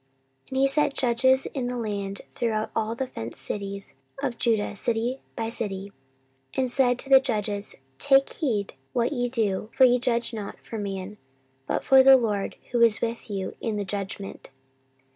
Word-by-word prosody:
14:019:005 - - -19
And 265 - -3
he 270 +1 +5
set 290 +1 +2
judges 260 +2 +3
in 260 -4 -2
the 250 0 -3
land 200 -3 -3
throughout 220 -3 -1
all 225 0 -1
the 265 - -2
fenced 115 - -7
cities 200 -1 -4 0.3
of 260 -4 -3
Judah, 220 -3 +1
city 235 +4 -1
by 225 -1 -2
city, 200 -3 -4 0.6
14:019:006 - - -10
And 255 -2 +2
said 250 -2 +4
to 270 - -7
the 270 -1 +9
judges, 210 -5 -2 0.2
Take 270 -1 +4
heed 220 - -1 0.2
what 240 +2 +1
ye 245 -2 -1
do: 215 -4 -1
for 265 - +6
ye 250 0 +4
judge 235 -1 0
not 210 -3 -6
for 225 - -7
man, 195 0 -5 0.5
but - - -1
for 265 -1 +7
the 265 0 +8
LORD, 210 -5 -1 0.2
who 240 -1 +1
is 230 -2 +6
with 230 -1 -3
you 195 -2 -4
in 220 -2 -2
the 205 - -2
judgment. 195 0 -5
230 Hz, 180 wpm, -26 LUFS, 205-255 Hz, 0.6 s, the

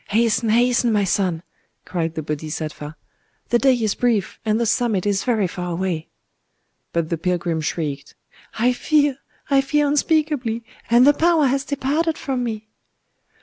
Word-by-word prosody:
"Hasten, 225 +1 +2
hasten, 240 +1 +3
my 210 -2 +2
son!" 180 -3 0 0.4
cried 170 -3 -3
the 160 - -3
Bodhisattva: 155 0 -5 0.5
"the 240 - +3
day 265 0 +4
is 220 -4 0
brief, 230 -6 0
and 220 0 +1
the 235 - +1
summit 230 -4 +1
is 200 -1 +1
very 225 -5 +1
far 180 0 -4
away." 170 -3 -2 0.8
But 170 -2 -1
the 170 - -2
pilgrim 170 -2 -1
shrieked,—"I 160 - -3
fear! 290 0 +1 0.3
I 275 -1 +5
fear 295 +2 +1
unspeakably!—and 255 -6 +1
the 290 - +7
power 325 0 +3
has 270 +1 +1
departed 295 +4 -1
from 260 -3 -2
me!" 220 -2 -4
225 Hz, 145 wpm, -21 LUFS, 175-265 Hz, 0.8 s, the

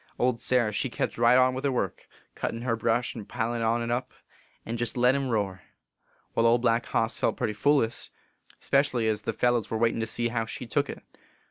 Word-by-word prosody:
Old 125 -2 +1
Sarah 120 -4 +2
she 115 +5 -1
kept 115 - -3
right 120 +1 +6
on 130 0 +4
with 130 +1 -4
her 140 - +1
work, 100 -8 -3 0.3
cuttin 115 +1 -4
her 120 -2 0
brash 115 +2 0
and 110 -4 -9
pilin 120 0 -2
on 115 +1 +1
t 120 - 0
up, 125 +2 -4 0.5
and 115 +1 -4
jest 120 +1 -2
let 125 +1 +4
him 135 -1 -1
roar. 100 -5 -1 0.7
Wai, 115 - +2
Old 115 +1 +4
Black 115 -1 +2
Hoss 115 0 0
felt - - 0
putty 105 - -1
foolish, 130 0 +1 0.5
spe - - -13
cially 125 -6 -1
ez 110 -1 0
the - - -2
fellers 120 -2 +1
were 110 - -1
waitin 115 0 +1
to 110 - -1
see 120 +1 0
how 115 -1 -1
she 125 - -6
took 115 - 0
it. - - -7
115 Hz, 220 wpm, -27 LUFS, 115-125 Hz, 0.7 s, right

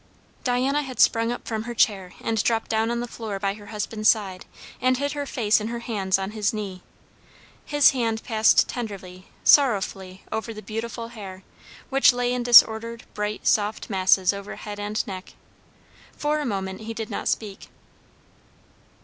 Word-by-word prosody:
Diana 260 +4 +1
had 260 -5 -8
sprung 230 +1 +4
up 245 - -6
from 220 -1 -3
her 240 0 -5
chair 195 -5 +1
and 225 -2 0
dropped 225 -1 0
down 220 +1 +1
on 235 0 -1
the 240 - -4
floor 220 -4 -5
by 195 0 -1
her 205 0 -13
husband's 215 0 0
side, 195 -4 0 0.3
and 255 0 +3
hid 285 +2 -1
her 290 -1 -4
face 215 -4 +2
in 215 - -3
her 235 +1 -4
hands 195 -6 0
on 195 +1 -4
his 210 -2 0
knee. 200 -4 -6 0.8
His 290 -1 +5
hand 230 -4 -1
passed 220 -2 +4
tenderly, 190 -6 -7 0.2
sorrowfully, 195 -8 +3
over 220 0 -4
the 215 - -9
beautiful 230 +1 -5
hair, 195 -5 -9 0.5
which 270 -1 +5
lay 245 0 0
in 250 - -1
disordered, 230 -1 +5
bright, 210 0 -4
soft 210 +1 +1
masses 190 0 +3
over 200 +1 -7
head 205 -1 -8
and 210 +1 -2
neck. 185 -2 -8 0.8
For 300 +1 0
a 295 - -3
moment 190 -2 -4
he 225 +1 -6
did 220 -1 -5
not - - -3
speak. 205 -3 -3
220 Hz, 170 wpm, -24 LUFS, 200-235 Hz, 0.8 s, His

